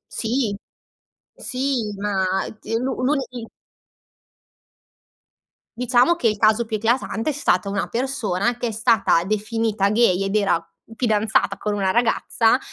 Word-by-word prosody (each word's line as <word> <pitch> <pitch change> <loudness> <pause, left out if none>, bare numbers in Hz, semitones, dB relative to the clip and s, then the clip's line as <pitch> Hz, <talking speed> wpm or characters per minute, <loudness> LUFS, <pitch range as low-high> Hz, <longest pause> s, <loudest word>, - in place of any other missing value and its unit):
Sì 225 -2 -1 0.8
sì 255 -5 -2
ma 200 -2 -1 0.3
di 225 - -4
l'un 255 +2 -2
l'uni 255 -4 -2 2.3
Diciamo 250 +6 +3
che 250 - 0
il 215 -1 0
caso 215 +2 +3
più 220 -1 -3
eclatante 230 +4 0
è - - -5
stata 200 -9 +1
una 200 0 -2
persona 240 -3 -1
che 245 - -2
è 225 - -2
stata 220 -6 +2
definita 215 0 0
gay 210 -4 +3
ed 195 +2 -2
era 195 -5 +2 0.3
fidanzata 220 -2 +1
con 210 -1 -2
una 195 -2 0
ragazza, 230 +2 +2
225 Hz, 125 wpm, -22 LUFS, 205-245 Hz, 2.3 s, Diciamo